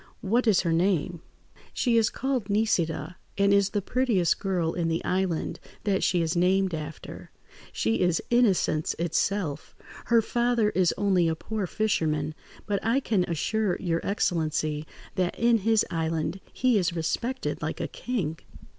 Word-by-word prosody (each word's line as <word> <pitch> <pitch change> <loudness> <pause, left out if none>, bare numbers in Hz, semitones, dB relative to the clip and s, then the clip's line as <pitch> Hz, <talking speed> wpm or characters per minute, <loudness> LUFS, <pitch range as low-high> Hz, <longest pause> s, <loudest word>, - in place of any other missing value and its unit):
What 235 +5 +1
is 210 -4 +5
her 165 - 0
name?" 175 -1 +1 0.5
"She 240 -3 +1
is 225 -1 +4
called 260 -6 -2
Nisida, 180 -6 0 0.2
and 200 0 +4
is 200 -1 +4
the 205 -2 -2
prettiest 215 -9 +1
girl 180 -5 -1
in 170 -2 -1
the 165 0 -1
island 185 -3 -1 0.2
that 200 -3 +1
she 175 -2 +2
is 160 +1 -1
named 185 +1 +2
after. 155 -1 -7 0.4
She 110 +1 0
is 175 -2 +2
innocence 195 -10 +2
itself. 170 -1 -1 0.3
Her 230 -1 +4
father 235 -2 +1
is 185 -2 +2
only 190 -4 +2
a 160 - 0
poor 210 +3 -4
fisherman, 155 -8 0 0.3
but 200 -2 -2
I 230 +4 +2
can 210 -9 +1
assure 190 +4 0
your 165 -3 -1
excellency 155 -5 -1 0.3
that 180 -1 0
in 235 -1 +3
his 220 +1 +2
island 160 +1 -1
he 250 -4 +2
is 180 -2 0
respected 235 +10 -2
like - - -3
a - - -2
king." 180 -11 -3
185 Hz, 155 wpm, -27 LUFS, 165-220 Hz, 0.5 s, is